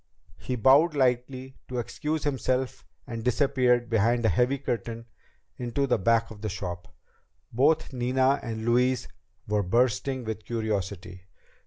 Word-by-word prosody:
He 125 - -3
bowed 140 +8 +5
slightly 130 0 -1
to 125 - -5
excuse 150 +5 -3
himself 130 -2 -1 0.2
and 115 -2 -6
disappeared 125 -1 +2
behind 115 +1 +2
a - - +5
heavy 125 - +2
curtain 115 -3 -4 0.5
into 125 +3 -1
the 125 -4 +1
back 115 +3 +2
of 105 -2 -11
the 110 - -3
shop. 90 -3 -5 0.7
Both 145 +4 +2
Nina 130 +2 +2
and 110 -1 -5
Louise 125 +1 +2 0.4
were 105 0 +1
bursting 120 +5 +1
with 110 -1 -5
curiosity. 95 -5 -4
120 Hz, 135 wpm, -27 LUFS, 110-130 Hz, 0.7 s, bowed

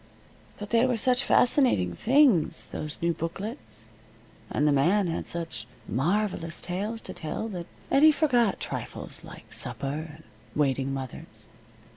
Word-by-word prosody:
But 205 0 -8
they 235 +2 +4
were 250 -2 +1
such 250 +3 +3
fascinating 245 - +3
things, 245 - +3
those 150 -1 -4
new 170 0 +2
booklets, 160 - -6 0.6
and 150 - +1
the - - +4
man 175 +9 +3
had 165 -1 -3
such 165 -10 -5 0.2
marvelous 170 +2 -1
tales 205 +6 -3
to - - -6
tell, 160 +7 -4
that 175 -4 -6 0.2
Eddie 295 +3 +7
forgot 245 -9 +2
trifles - - -5
like - - -12
supper 150 +4 +1
and 155 +1 -15 0.3
waiting 135 -2 +1
mothers. 135 -2 -6
170 Hz, 135 wpm, -27 LUFS, 145-230 Hz, 0.6 s, Eddie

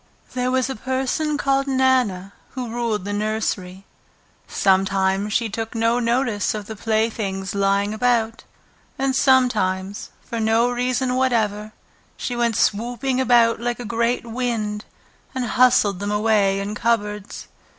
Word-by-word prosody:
There 250 0 -1
was 260 0 +1
a 265 - -4
person 265 +5 -1
called 275 -1 +1
Nana 255 -8 +1 0.2
who 250 -3 -4
ruled 230 -4 -2
the 205 - -3
nursery. 205 -3 -2 0.6
Sometimes 195 +1 +1
she 230 +2 +1
took 225 +2 -5
no 230 +1 +2
notice 235 -4 0
of 210 -1 -5
the 220 - -7
playthings 215 -3 -1
lying 200 +1 +1
about, 230 -1 0 0.5
and 265 0 0
sometimes, 210 -8 +1
for 230 - -5
no 225 +2 +2
reason 250 +1 0
whatever, 220 -5 0 0.5
she 245 - -3
went 235 -2 0
swooping 245 +5 0
about 235 -3 +4
like 240 0 -2
a 245 - -6
great 235 +2 0
wind 225 -3 -3 0.5
and 255 -1 -1
hustled 235 -5 +3
them 205 +1 -3
away 210 -2 +2
in 200 +1 -4
cupboards. 210 -2 -2
225 Hz, 135 wpm, -22 LUFS, 205-250 Hz, 0.6 s, about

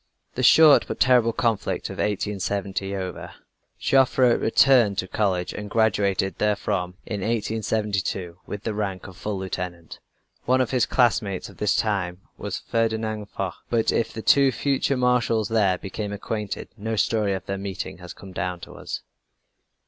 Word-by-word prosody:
The 130 - -3
short 150 +4 +7
but - - -5
terrible 125 -3 +4
conflict 115 -4 -1
of - - -8
1870 100 -1 -2
over, 95 -3 -6 0.4
Joffre 130 -2 +4
returned 115 -4 +4
to 95 - -1
college, 95 -3 -1
and 105 0 -6
graduated 100 -3 +1
therefrom 100 -3 0
in 105 -3 -4
1872, 105 -4 -2
with 105 0 -6
the 110 - -2
rank 100 -3 -3
of 95 - -10
full 100 +2 -4
lieutenant. 90 -3 -6 0.5
One 130 +1 +3
of 130 - +1
his 125 -2 +2
classmates 105 -7 +1
of 95 - -15
this 105 - +1
time 95 -4 -1
was - - -5
Ferdinand 110 -2 -1
Foch, 95 -3 -5
but 115 -2 +2
if 115 - 0
the 110 - -7
two 140 -1 +5
future 135 +1 0
Marshals 125 -3 +2
there 100 -5 +2
became 100 +3 -5
acquainted 105 0 -4
no 110 +2 -3
story 105 -1 +1
of 95 -1 -6
their 100 0 -3
meeting 95 -3 -5
has 90 -1 -9
come 95 - -11
down 90 -1 -3
to - - -10
us. - - -6
105 Hz, 155 wpm, -24 LUFS, 95-115 Hz, 0.5 s, short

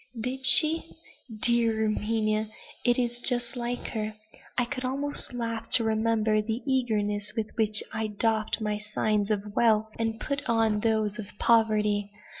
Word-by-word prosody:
"Did 260 +3 -1
she? 320 +4 +5 0.5
dear 230 -2 +2
Erminia! 215 0 -1 0.3
it 245 -1 +2
is 240 -1 -2
just 240 -1 0
like 245 0 -4
her. 215 -1 -4 0.4
I 245 - +2
could 255 +1 -5
almost 280 +3 0
laugh 230 -2 -4
to 235 - +7
remember 220 -1 +1
the 220 +3 -4
eagerness 215 -6 -1
with 220 -1 -2
which 215 -2 +2
I 220 0 -2
doffed 215 +1 0
my 210 -1 -2
signs 210 0 -1
of 205 0 -3
wealth, 220 -2 +2
and 225 0 -2
put 280 -1 -3
on 225 -2 +2
those 215 -1 0
of 205 - -6
poverty. 210 -3 +2
220 Hz, 150 wpm, -27 LUFS, 215-240 Hz, 0.5 s, to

